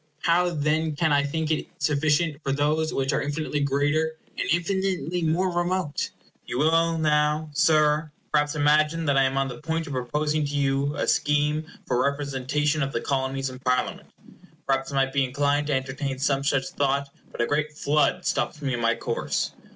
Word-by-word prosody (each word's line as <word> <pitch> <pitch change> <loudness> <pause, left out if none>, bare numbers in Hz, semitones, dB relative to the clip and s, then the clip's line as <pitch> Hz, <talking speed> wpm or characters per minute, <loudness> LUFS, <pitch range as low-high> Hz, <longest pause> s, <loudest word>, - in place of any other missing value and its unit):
How 175 +1 +3
then 155 -1 0
can 155 0 +2
I 145 - +4
think 160 +2 -2
it 155 - -1
sufficient 150 +1 +1
for 135 - -2
those 150 +3 +1
which 135 0 0
are - - +1
infinitely 150 +1 -2
greater, 145 +3 +1 0.2
and - - -2
infinitely 180 -1 0
more 170 +3 +1
remote? 175 -3 -1 0.4
You - - -3
will 165 +3 +3
now, 150 0 +1
Sir, 155 0 +3 0.2
perhaps 150 0 +2
imagine 150 +2 +2
that 140 -2 +2
I 135 0 +4
am 135 +1 -1
on 135 0 +1
the 125 -2 -7
point 165 +1 -2
of 145 - -6
proposing 150 +5 -1
to 145 - -4
you 140 +1 +1
a - - -1
scheme 150 +1 +1 0.2
for 125 - 0
a 140 - +4
representation 145 +2 -1
of 135 0 -1
the 115 - -1
Colonies 135 0 -1
in 130 - -10
Parliament. 125 -1 -1 0.6
Perhaps 135 0 0
I - - -4
might 135 0 +1
be 140 -1 +3
inclined 145 +3 0
to 150 - 0
entertain 135 +1 -2
some 140 0 +1
such 135 -1 +1
thought; 140 0 0 0.2
but - - -11
a 120 - +3
great 150 +3 -1
flood 150 +1 +1
stops 150 - -1
me 140 -3 -2
in 120 - -2
my 115 +1 +2
course. - - -2
145 Hz, 190 wpm, -25 LUFS, 135-155 Hz, 0.6 s, I